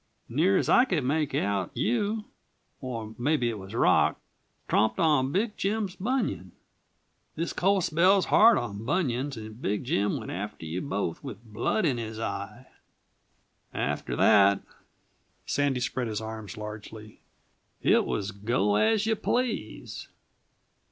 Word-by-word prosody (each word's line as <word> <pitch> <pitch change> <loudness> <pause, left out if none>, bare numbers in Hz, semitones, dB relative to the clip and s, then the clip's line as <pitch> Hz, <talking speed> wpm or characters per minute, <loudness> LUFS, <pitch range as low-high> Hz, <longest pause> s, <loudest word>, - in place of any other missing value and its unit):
Near 170 +11 +2
as - - 0
I 245 - +6
could 175 - 0
make 150 +2 0
out, 100 -3 0
you 205 - 0 0.5
or 115 -4 -5
maybe 125 -2 +1
it 110 - -6
was 95 +3 -9
Rock - - +3 0.5
tromped 110 +1 +2
on 145 -5 +3
Big 210 +5 0
Jim's 200 -1 -1
bunion. 205 - -2 0.8
This 165 +1 -2
cold 195 0 +2
spell's 185 +5 +4
hard 225 +1 +6
on 105 -3 -4
bunions 135 -2 -1
and 110 +2 -9
Big 105 +1 -1
Jim 105 -5 0
went - - -6
after 100 -2 -5
you 80 +3 -3
both 100 - -3
with 120 -5 -8
blood 115 - -1
in 130 -6 +1
his 110 -1 -5
eye. 105 +2 -5 1.1
"After - - -2
that" 100 -1 +5 0.8
Sandy 140 -3 0
spread 125 0 -2
his 110 -2 -3
arms 110 -3 -7
largely 105 0 -9 0.6
"it - - +4
was 100 0 -2
go 105 0 0
as 220 - +3
you 220 0 +2
please. 245 +2 -3
120 Hz, 140 wpm, -27 LUFS, 105-180 Hz, 1.1 s, I